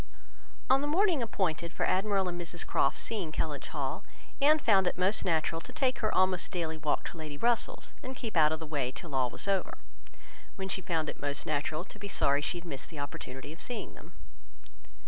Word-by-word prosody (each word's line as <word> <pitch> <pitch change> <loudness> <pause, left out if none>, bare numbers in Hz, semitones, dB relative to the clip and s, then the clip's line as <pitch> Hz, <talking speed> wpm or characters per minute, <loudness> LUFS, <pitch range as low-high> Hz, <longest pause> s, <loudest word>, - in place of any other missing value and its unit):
On 265 +1 +5
the 290 - -1
morning 340 -1 +3
appointed 175 -7 -1
for - - 0
Admiral 195 0 +2
and 175 -1 -3
Mrs 175 0 -5
Croft's 140 - +2
seeing 200 -9 -2
Kellynch 155 -2 -2
Hall, - - -3 0.4
Anne 300 +2 +7
found 195 -10 +4
it - - 0
most 185 +4 +2
natural 165 -1 +1
to - - -8
take 260 -2 +1
her 215 - +1
almost 185 -1 +3
daily 165 -3 -1
walk 155 -2 0
to - - -11
Lady 155 -2 -6
Russell's, 240 - 0
and 260 +1 -6
keep 230 -4 -5
out 155 -2 +6
of 160 - 0
the 160 - -7
way 145 -5 -1
till 155 +2 -8
all 130 -2 +2
was 195 - 0
over; 195 -2 0 0.8
when 190 0 -4
she 190 - -1
found 165 -4 0
it - - -5
most 145 +1 0
natural 155 +2 -1
to - - -12
be 200 - -5
sorry 140 -7 +2
that - - -1
she 180 - -1
had 175 - -8
missed 140 -5 -6
the 160 - -10
opportunity 145 0 -6
of 165 - -10
seeing 245 -2 -4
them. - - -14
175 Hz, 215 wpm, -31 LUFS, 155-205 Hz, 0.8 s, Anne